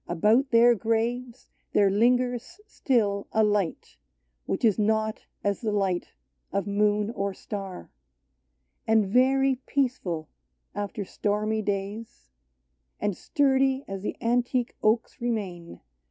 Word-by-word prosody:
About 215 - +3
their 240 0 +6
graves 235 +2 -2 0.3
there 200 -1 +4
lingers 245 - +1
still 215 - 0
a 220 - +3
light 205 -5 -1 0.5
Which - - 0
is 215 -2 +3
not 220 +1 0 0.2
as 200 -1 -1
the 220 -3 -1
light 195 -4 -1 0.4
of 200 -1 -1
moon 210 +1 +1
or 200 -4 -3
star; 195 -3 -7 1.0
And 220 -1 +4
very 260 +5 +3
peaceful 195 - -1 0.5
after 205 0 -4
stormy 215 +3 -1
days, 205 - -5 0.7
And 205 -2 -1
sturdy 270 - +1
as 195 -1 -5
the 210 - -4
antique 245 +1 0
oaks 220 +2 +1
remain, 200 -8 -3
40 - - -11
OLD - - -15
ST. - - -45
215 Hz, 125 wpm, -26 LUFS, 200-245 Hz, 1.0 s, their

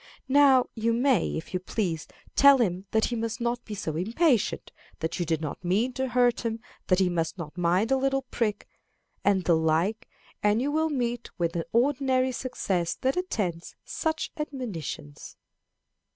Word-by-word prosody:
Now 275 -3 +6
you 230 0 0
may, 245 -4 +2
if 160 - -8
you 185 - 0
please, 180 -4 -2 0.3
tell 280 0 +8
him 190 -5 -1
that 220 +1 +2
he 240 - -2
must 230 +1 -3
not 240 0 -1
be 210 - -6
so 160 -6 -4
impatient, 230 - +1 0.3
that 160 +3 -3
you 175 - -1
did 160 -1 0
not 155 +3 -5
mean 210 +9 +1
to 265 +1 -1
hurt 245 -1 +2
him, 230 -1 -2 0.3
that 185 - +4
he 190 -1 +3
must 170 0 -1
not 165 -3 -7
mind 180 +6 +1
a 270 - +4
little 270 0 0
prick, 225 -4 -2 0.6
and 195 -2 +3
the 170 - +4
like, 160 +7 0 0.3
and 210 +1 +3
you 275 +4 0
will 315 +1 +1
meet 240 -4 -2
with 170 -2 0
the 165 -1 -3
ordinary 260 +1 +2
success 190 -9 -2
that 265 +1 +1
attends 205 - -3
such 320 -1 -2
admonitions. 220 - -6
225 Hz, 170 wpm, -27 LUFS, 175-260 Hz, 0.6 s, tell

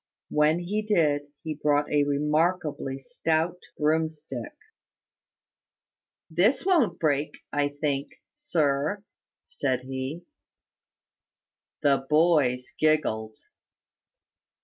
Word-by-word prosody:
When 150 +2 +3
he 190 +5 -2
did, 155 -9 +1 0.2
he 160 - -3
brought 145 0 +1
a 145 -1 +3
remarkably 150 -1 0
stout 165 - -1 0.2
broomstick. 160 - -1 1.7
"This 190 - +2
won't 340 - +3
break, 150 -2 0 0.2
I 145 0 +1
think, 140 -2 -1 0.3
sir," 160 - 0 0.4
said 130 -3 -1
he. 130 +5 -5 1.6
The 140 -2 +2
boys 150 -6 +3
giggled. 110 -9 +1
150 Hz, 80 wpm, -27 LUFS, 145-170 Hz, 1.7 s, When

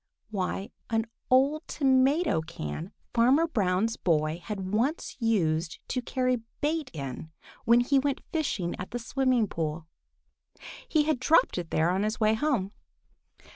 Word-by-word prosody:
Why, 195 0 -3 0.2
an 225 -1 +1 0.2
old 275 +5 +3
tomato 265 - +2
can 160 - -6 0.2
Farmer 255 +7 +4
Brown's 215 - 0
boy 155 -1 0
had 195 -2 -5
once 255 +9 0
used 170 -8 +1
to 250 - -1
carry 255 0 0 0.2
bait 305 -1 -1
in 140 +1 -6 0.4
when 235 +1 +6
he 270 +3 +3
went 280 0 -1
fishing 215 - -1
at 180 - -5
the 245 - -3
Smiling 255 -1 +1
Pool. 160 -2 -3 1.0
He 310 - +3
had 305 -4 0
dropped 280 - +3
it 170 -2 -6
there 160 +2 +2
on 190 +2 0
his 215 +1 -1
way 215 -1 +4
home. 220 -6 0
225 Hz, 140 wpm, -28 LUFS, 180-265 Hz, 1.0 s, when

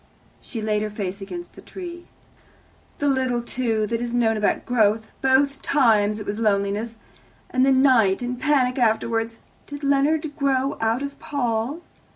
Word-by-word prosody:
She 225 -4 -6
laid 210 -1 0
her 215 - -2
face 200 -1 -5
against 345 - -7
the - - -13
tree. 345 -2 -9 0.9
"The 290 - -1
little, 260 -3 +1
too, 230 -3 -1
that 230 +2 -2
is 240 0 -3
known 225 -2 +2
about 210 -1 0
growth! 220 -2 +2 0.2
Both 270 +1 +2
times 215 -7 +3
it 210 - -7
was 205 +2 -3
loneliness, 210 +1 0 0.5
and 255 0 +2
the 270 - +4
night, 250 -6 +4
and 245 0 -3
panic 270 -4 +2
afterwards. 225 0 +1 0.3
Did 285 0 -8
Leonard 290 +2 +1
grow 275 0 +1
out 225 +4 +1
of 280 0 -6
Paul?" 250 +3 -2
240 Hz, 160 wpm, -23 LUFS, 220-275 Hz, 0.9 s, the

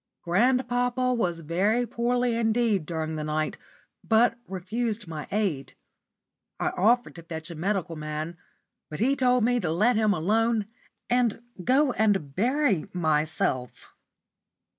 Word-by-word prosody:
Grandpapa 245 +5 +1
was 175 -8 -1
very 200 +10 +1
poorly 245 +1 0
indeed 225 -6 +1
during 160 -2 -3
the 155 - -3
night, 155 0 -2 0.4
but 230 +1 +3
refused 210 +3 -3
my 155 -2 -6
aid. 190 -10 -1 0.8
I - - +1
offered 240 +6 +2
to - - -8
fetch 160 0 -6
a - - -7
medical 180 0 -2
man, 155 +2 -5 0.5
but 150 - -6
he 265 +6 +2
told 250 -3 +3
me 245 +1 +2
to 175 -8 -2
let 215 +9 +3
him 215 -1 +3
alone 215 +5 +1 0.4
and 240 -2 +1 0.2
go 265 - +3
and 195 - 0
bury 245 - +1
myself. 155 -6 -1
210 Hz, 130 wpm, -26 LUFS, 165-240 Hz, 0.8 s, but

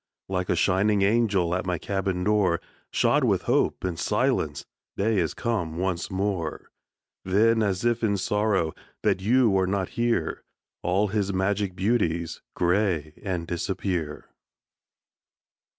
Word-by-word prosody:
Like 90 -1 -2
a - - +3
shining 100 +2 +2
angel 100 -5 +2
At 90 +1 -2
my 90 -1 0
cabin 95 0 -2
door, 100 -5 +2 0.3
Shod - - +3
with - - +2
hope - - +1
and 90 -3 -2
silence, - - 0 0.3
Day 105 0 +2
is 85 -3 -1
come 90 -9 -2
once 90 -1 -1
more. 95 -4 -3 0.5
Then, 110 +4 +3
as 100 0 0
if 120 -1 +2
in 100 -2 +2
sorrow 100 -4 +1 0.3
That 95 - +2
you 115 0 +3
are 95 - +1
not 95 -1 -1
here, 120 0 -1 0.4
All 100 +4 +1
his 100 -1 0
magic 95 0 0
beauties 85 -5 0
Gray 90 -4 +1
and 90 -4 -2
disappear. 85 -2 -3
95 Hz, 135 wpm, -26 LUFS, 90-105 Hz, 0.5 s, a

